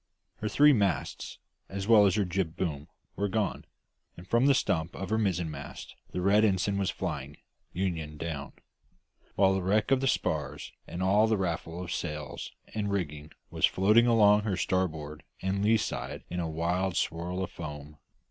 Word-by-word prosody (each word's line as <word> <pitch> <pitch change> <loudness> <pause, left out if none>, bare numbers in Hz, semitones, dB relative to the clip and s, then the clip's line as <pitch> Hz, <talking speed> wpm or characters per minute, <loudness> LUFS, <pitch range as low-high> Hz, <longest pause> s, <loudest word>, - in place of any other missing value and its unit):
Her 105 - -3
three 150 +4 +6
masts, 100 - -1 0.3
as 95 +1 -4
well 105 -3 +7
as 95 - +1
her 105 -2 +2
jib 90 -2 -2
boom, 75 -5 -3 0.3
were 100 - 0
gone; 100 -1 -1 0.5
and 90 +2 -11
from 120 +6 +3
the 140 - +5
stump 80 -8 0
of 95 - -5
her 110 - +2
mizzenmast 90 -6 -3 0.2
the 90 - -3
red 100 +3 +4
ensign 100 -1 +1
was 95 - 0
flying, 70 +1 -4 0.3
union 80 -5 -3
down; 75 -3 -5 0.8
while 95 -1 +4
the 95 - 0
wreck 105 +6 +1
of 135 -1 +4
the 135 - +1
spars - - -1 0.2
and 90 +2 -4
all 105 +4 +4
the 110 -1 +2
raffle 85 -1 -3
of 90 - -4
sails 75 0 -5 0.2
and 105 -2 -2
rigging 75 -6 -3 0.2
was - - +3
floating 105 +5 +4
along 105 -3 +5
her 105 -4 -2
starboard 80 -6 -1 0.2
or 95 - 0
lee 105 +3 +3
side 105 - -4
in 90 - -2
a 85 -2 -2
wild 85 +3 -1
swirl 90 +3 -2
of - - -5
foam. 75 -2 -8
95 Hz, 175 wpm, -29 LUFS, 80-105 Hz, 0.8 s, well